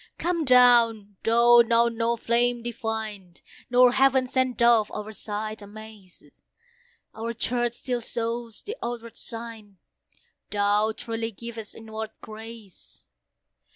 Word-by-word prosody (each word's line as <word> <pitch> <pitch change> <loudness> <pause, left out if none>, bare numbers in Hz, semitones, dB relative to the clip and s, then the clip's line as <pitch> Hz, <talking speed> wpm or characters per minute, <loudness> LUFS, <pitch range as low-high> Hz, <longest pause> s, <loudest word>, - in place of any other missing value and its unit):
Come 340 -2 -1
down! 235 -5 +5
though 235 +1 +6
now 235 0 +3
no 230 0 -1
flame 235 +1 0
divine, 220 -6 -5 0.3
Nor 250 0 +6
heaven 265 0 +3
sent 255 -1 0
Dove, 235 -3 +4
our 210 0 -6
sight 215 0 -5
amaze; 210 -2 -14 0.7
Our 230 +1 -4
Church 240 +1 -1
still 245 -2 -3
shows 230 -1 -3
the 435 - -6
outward 235 -1 -6
sign, 225 -4 -8 0.7
Thou 205 +1 +2
truly 225 -1 -4
givest 225 0 -9
inward 220 0 -7
grace. 220 -3 -12
230 Hz, 115 wpm, -25 LUFS, 215-240 Hz, 0.7 s, though